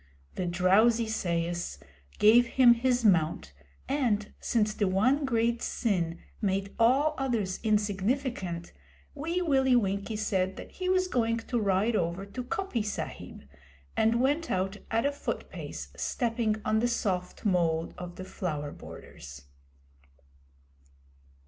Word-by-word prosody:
The 180 - -3
drowsy 200 +7 +3
sais 175 -4 -2 0.4
gave 235 +3 +6
him 245 0 +6
his 245 0 +1
mount, 160 - +2 0.3
and, 235 -7 0
since 215 -2 +1
the 205 -2 0
one 255 +10 +2
great 235 -2 +1
sin 175 -7 -1 0.2
made 195 -1 -1
all 270 +7 +4
others 225 -8 -1
insignificant, 205 -3 -1 0.4
Wee 335 +5 -2
Willie 265 -5 +3
Winkie 200 -1 0
said 190 -3 0
that - - -9
he 370 -1 -3
was 370 0 +2
going 230 -8 +1
to 235 +1 -2
ride 205 +2 +1
over 175 +1 -1
to 250 +5 -6
Coppy 320 - -2
Sahib, 210 - -6 0.5
and 225 +2 +3
went 290 +6 +1
out 190 +2 -1
at 230 +3 +1
a 285 - +2
foot 285 - -5
pace, - - -7
stepping 230 -3 -1
on 215 0 +2
the 240 - +2
soft 190 -7 -2
mould 170 -4 +1
of 175 -1 -8
the 185 - -7
flower 150 -6 -4
borders. 70 -1 -11
215 Hz, 130 wpm, -29 LUFS, 185-245 Hz, 0.5 s, gave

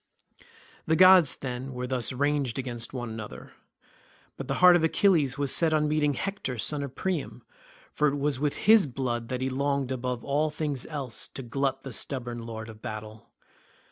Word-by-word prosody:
The 160 - +3
gods, 185 -3 +7
then, 130 0 -6
were 125 0 -4
thus 125 -2 -1
ranged 140 -2 0
against 120 -3 -4
one 120 -3 -5
another. 110 -1 -9 0.8
But 135 - -7
the 135 - -1
heart 180 -1 +7
of 170 - +2
Achilles 160 -6 +2
was 140 -2 +1
set 160 -2 +3
on 150 0 +2
meeting 150 -1 +1
Hector 195 -7 -4
son 145 +6 0
of 140 -2 -6
Priam, 135 - -3 0.5
for 150 - +1
it 140 - 0
was 140 -2 0
with 145 0 0
his 215 -5 +6
blood 120 -3 -3
that 125 0 -4
he 130 - 0
longed 140 0 -1
above 125 -2 -3
all 145 +2 +1
things 150 -4 -4
else 140 -6 -5
to 135 - -8
glut 135 +3 -2
the 135 - -7
stubborn 120 -2 -3
lord 110 -1 -6
of 110 -1 -12
battle. 110 +1 -8
135 Hz, 180 wpm, -27 LUFS, 125-150 Hz, 0.8 s, gods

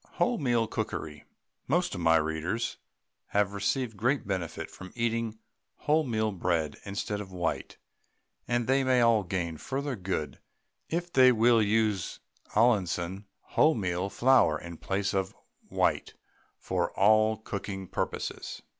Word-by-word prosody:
WHOLEMEAL 125 - +1
COOKERY 75 -7 -4 0.4
Most 175 +6 +1
of 90 - -4
my 80 -1 +5
readers 80 +8 -1 0.5
have 100 -1 +1
received 115 +3 -1
great 130 +7 +1
benefit 95 -4 -4
from 95 0 -10
eating 115 -1 -1 0.5
wholemeal 115 - +1
bread 80 -4 0
instead 105 +1 -3
of 95 -2 -9
white, 90 -2 -3 0.7
and 120 -1 +1
they 135 +2 +3
may 130 -1 +3
all 115 -2 +5
gain 85 -4 -3
further 135 - -3
good 95 -2 -3 0.5
it 175 +1 -3
they 130 -1 +7
will 115 0 +4
use 105 -3 +1 0.4
Allinson 100 -4 +1 0.2
wholemeal 95 - +2
flour 125 -12 +4
in 85 -1 -9
place 100 +4 -1
of 95 -1 -1 0.3
white - - 0 0.4
for 90 -2 -1
all 110 +2 +4
cooking 100 -3 -5
purposes. - - -4
105 Hz, 125 wpm, -29 LUFS, 95-120 Hz, 0.7 s, they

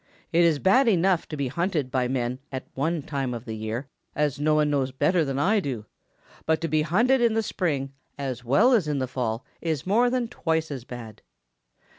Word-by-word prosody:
It 170 +1 +5
is 165 -3 +4
bad 240 - +4
enough 185 -4 +3
to 150 - -6
be 140 -2 -1
hunted 155 -2 -1
by 130 -2 +1
men 125 0 -2
at 130 -1 -5
one 155 +3 -1
time 135 -4 -3
of 115 +1 -8
the 110 - -5
year, 110 +4 -4 0.3
as 150 -2 0
no 155 +1 +2
one 150 -1 +2
knows 135 -2 0
better 150 +6 +2
than 135 -2 -2
I 205 +9 +3
do, 125 - -4 0.6
but 160 0 +3
to 165 - -1
be 155 0 +2
hunted 235 - +3
in 230 -2 +3
the 225 - +1
spring 140 -9 -2 0.2
as 130 -4 -4
well 140 - +4
as 205 -10 +3
in 150 -1 0
the 130 - 0
fall 120 -2 -3 0.2
is 160 -5 -2
more 230 +6 +3
than 245 -1 0
twice 160 -8 -1
as 130 -4 -6
bad. 120 -4 -9
150 Hz, 210 wpm, -25 LUFS, 130-175 Hz, 0.6 s, It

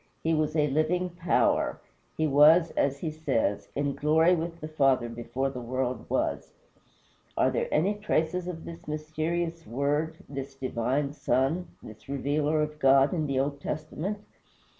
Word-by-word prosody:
He 165 - +2
was 155 0 0
a 150 -2 +3
living 160 +5 0
power. 175 0 +1 0.4
He 155 - +1
was, 155 +4 +6
as 140 0 0
he 160 - -2
says, 135 -10 -1
in 140 0 0
glory 160 +5 +3
with 170 0 -3
the 155 - -6
Father 135 -5 +2
before 120 +3 -3
the 125 -2 -6
world 130 +1 -3
was. - - -1 0.8
Are - - +3
there - - -1
any 185 +7 +2
traces 180 -4 -1
of 165 -3 -6
this 165 -2 -10
mysterious 160 +2 -3
Word, 145 +5 -1
this 135 -1 -6
divine 130 +2 -1
Son, 150 +5 0 0.2
this 110 +4 -13
Revealer 145 +2 +1
of 150 0 -5
God 135 +1 +5
in 155 -4 -1
the 135 -1 0
Old 140 +1 -1
Testament? 155 +7 -4
150 Hz, 155 wpm, -28 LUFS, 135-160 Hz, 0.8 s, was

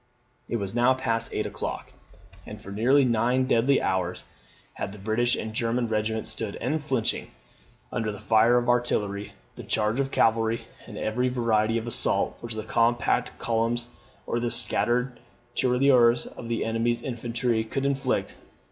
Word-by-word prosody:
It - - -1
was 100 -3 -3
now 120 +2 +4
past 115 -3 -2
eight - - -2
o'clock, - - -5 0.6
and - - -8
for 100 - -10
nearly 130 +7 +4
nine 125 +2 +2
deadly 130 +2 +3
hours 90 -1 -1 0.5
had 95 - -5
the - - -10
British 110 +4 +1
and 110 0 -5
German 115 +1 0
regiments 110 0 -1
stood 110 -3 -4
unflinching 135 -3 -1 0.6
under 110 -3 -1
the 105 - -8
fire 115 +2 +4
of 120 0 0
artillery, 105 -5 0 0.2
the - - -7
charge 110 +4 0
of 135 -1 0
cavalry, 115 -2 +1 0.2
and - - -9
every 125 +4 0
variety 115 -2 +1
of 115 - -3
assault, 120 - -1
which 120 -2 -6
the 110 - -4
compact 120 +2 +1
columns 120 +1 -1 0.4
or 120 - -1
the 120 0 -1
scattered 125 +2 +1 0.3
tirailleurs 125 -2 +4
of 115 - -9
the 115 - -1
enemy's 115 +1 0
infantry 120 -2 0
could 135 +5 -3
inflict. 135 -2 -1
115 Hz, 155 wpm, -26 LUFS, 110-125 Hz, 0.6 s, now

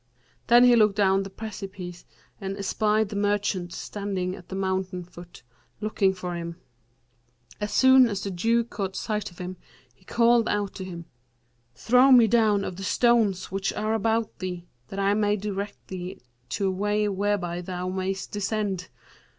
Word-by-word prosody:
Then 240 +1 +7
he 245 -1 +7
looked 210 -3 +4
down 195 -2 +3
the 195 - -5
precipice 190 -4 -8 0.3
and 195 0 -4
espied 210 +1 +1
the 205 - -6
merchant 200 -3 0
standing 190 -2 -4
at 180 - -14
the 190 - -5
mountain 190 -1 -2
foot, 175 -5 -13 0.4
looking 210 -2 +1
for 185 -1 -5
him. 170 0 -5 1.0
As 210 0 -3
soon 260 +2 +6
as 200 -2 -3
the 200 - -3
Jew 230 +6 +2
caught 195 -4 -5
sight 210 -2 -2
of 175 - -19
him, 180 0 -6 0.4
he 160 - -28
called 235 +2 +3
out 205 -1 -1
to 190 - -6
him, 170 -2 -7 0.7
'Throw 250 - +4
me 245 -3 +8
down 215 -3 +3
of 180 - -5
the 195 - -6
stones 215 -4 +2
which 195 0 -1
are 215 +1 -1
about 225 +1 0
thee, 180 -2 -5 0.2
that 195 - -8
I 200 0 +2
may 210 0 +2
direct 205 0 -5
thee 185 0 -6 0.3
to 195 +11 -1
a 190 - +2
way 205 +2 0
whereby 195 -3 -1
thou 180 0 -4
mayst 190 +1 -3
descend.' 205 -2 -2
195 Hz, 165 wpm, -26 LUFS, 185-215 Hz, 1.0 s, me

